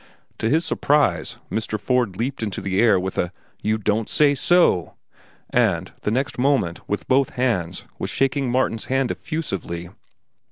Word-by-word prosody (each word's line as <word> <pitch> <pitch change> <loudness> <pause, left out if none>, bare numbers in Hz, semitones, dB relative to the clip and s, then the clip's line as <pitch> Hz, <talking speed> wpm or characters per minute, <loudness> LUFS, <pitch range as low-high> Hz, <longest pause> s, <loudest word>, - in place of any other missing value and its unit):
To 110 - +1
his 160 +5 +2
surprise, 145 -4 +1
Mr. 110 -1 -2
Ford 120 -5 0
leaped 130 +3 -2
into 105 -4 -3
the 95 0 -1
air 110 -5 +5
with 95 +1 -3
a 90 - 0 0.3
"You 110 +1 +1
don't 105 +1 0
say 145 -2 +4
so!" 145 - +3 0.6
and - - +1
the - - -1
next 130 +4 -1
moment, 130 -11 +1
with 105 -2 -2
both 135 +1 +3
hands, 100 -9 -1
was - - -3
shaking 135 -1 0
Martin's 125 -3 0
hand 135 -1 0
effusively. 90 - -4
120 Hz, 155 wpm, -22 LUFS, 100-135 Hz, 0.6 s, air